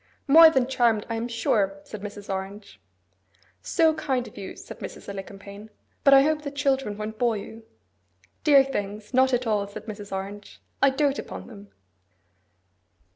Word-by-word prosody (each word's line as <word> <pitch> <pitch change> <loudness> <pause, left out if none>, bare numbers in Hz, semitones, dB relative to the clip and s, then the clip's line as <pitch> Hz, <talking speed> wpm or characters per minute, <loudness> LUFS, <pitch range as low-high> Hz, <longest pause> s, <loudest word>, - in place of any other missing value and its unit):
'More 320 +3 +9
than 265 -5 +2
charmed, 240 -5 +1
I - - -1
am 225 +1 -3
sure!' 205 -4 0
said 215 - -9
Mrs. 205 0 -8
Orange. 195 - -6 0.8
'So 320 - +3
kind 270 -6 -2
of - - -14
you!' - - -8
said - - -11
Mrs. - - -9
Alicumpaine. 200 +1 -9 0.3
'But 275 -1 +7
I 270 - +7
hope 305 +1 +1
the 290 - -5
children 270 -6 -1
won't 215 +1 -6
bore 235 -3 +2
you?' 220 +3 -9 0.8
'Dear 280 -3 +7
things! 210 -4 -5
Not 260 +1 +4
at 250 0 0
all,' 210 -3 0
said 200 - -10
Mrs. 205 -2 -8
Orange. 195 +2 -7 0.2
'I 275 - +6
dote 275 0 0
upon - - -7
them. 205 -3 -12
225 Hz, 165 wpm, -25 LUFS, 205-270 Hz, 0.8 s, More